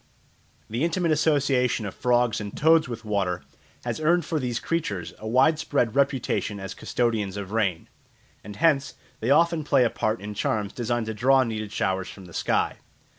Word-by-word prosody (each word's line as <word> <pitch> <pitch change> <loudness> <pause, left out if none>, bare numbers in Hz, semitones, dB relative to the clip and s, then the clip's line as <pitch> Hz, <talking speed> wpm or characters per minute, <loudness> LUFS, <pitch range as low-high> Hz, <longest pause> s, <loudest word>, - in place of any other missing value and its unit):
The 115 +6 -2
intimate 170 0 +1
association 140 -7 +2
of 100 - -5
frogs 120 -2 +1
and 105 -1 -7
toads 160 0 +4
with 115 -1 -6
water 95 -4 -1 0.4
has - - -2
earned 165 +1 +2
for 160 -1 -1
these 120 -3 -2
creatures 105 - -3
a 110 - -7
widespread 135 -1 +2
reputation 135 -6 0
as 95 0 -6
custodians 110 -5 -1
of 100 -1 -6
rain; 100 -7 0 0.6
and 105 0 -9
hence 145 -2 +2 0.2
they 115 - -2
often 165 +2 +3
play 140 -3 +3
a 120 - +1
part 110 +1 -1
in 105 +1 -6
charms 105 0 -1
designed 120 -1 -1
to 110 - -3
draw 130 +4 +4
needed 110 -3 -4
showers 95 -2 -1
from 95 - -11
the 85 - -13
sky. - - 0
120 Hz, 175 wpm, -25 LUFS, 105-145 Hz, 0.6 s, toads